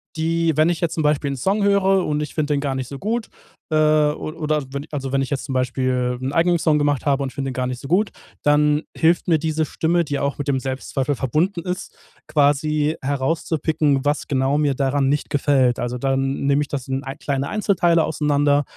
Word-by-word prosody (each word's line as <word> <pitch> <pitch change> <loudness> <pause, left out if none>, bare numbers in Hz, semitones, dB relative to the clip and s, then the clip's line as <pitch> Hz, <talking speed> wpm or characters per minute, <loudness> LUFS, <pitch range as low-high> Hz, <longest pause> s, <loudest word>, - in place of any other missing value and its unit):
die 165 0 +1
wenn 155 +2 +4
ich 170 -2 -1
jetzt 170 - 0
zum 160 - -1
Beispiel 150 -1 +1
'n - - -3
Song 195 - 0
höre 195 -2 +3
und 150 0 -1
ich 150 - -5
find 155 -2 -1
eden 145 -1 +1
gar 140 -2 -1
nicht 130 -2 -3
so 140 - -7
gut, 220 - -2 0.4
äh, 155 - 0
o 155 -1 +2
oder 155 -2 -1
wenn 140 +1 -5
also 135 -3 -4
wenn 135 0 +1
ich 135 - -3
jetzt 140 -2 -2
zum - - -6
Beispiel 125 -1 0
'n 130 +2 -2
eigenen 170 +2 +3
Song 155 -2 +2
gemacht 145 -2 0
habe 140 -1 +2
und 135 -1 -2
finde 135 -1 -3
den - - -6
gar 125 0 -2
nicht 125 -1 -4
so 135 - -8
gut, 200 +4 +2 0.3
dann 150 +1 +3
hilft 170 +2 +2
mir 165 -2 +4
diese 155 0 -1
Stimme, 170 +3 0
die 145 -1 -2
auch 140 0 -1
mit 145 - -3
dem 135 -2 +1
Selbstzweifel 135 +1 -2
verbunden 160 - 0
ist, 180 +1 -5 0.3
quasi 150 +1 +2
herauszupicken, 145 0 0
was 145 +1 0
genau 135 0 +1
mir 145 -2 +2
daran 135 +1 +1
nicht 145 +1 -1
gefällt. 135 -4 +2
Also, 120 +1 -2
dann 135 +1 -1
nehm 140 +1 +3
ich 145 - -2
das 135 -2 -4
in 135 0 -2
k 135 -1 -5
kleine 140 -1 -2
Einzelteile 175 -6 +2
auseinander, 145 -1 +2
145 Hz, 220 wpm, -21 LUFS, 135-160 Hz, 0.4 s, wenn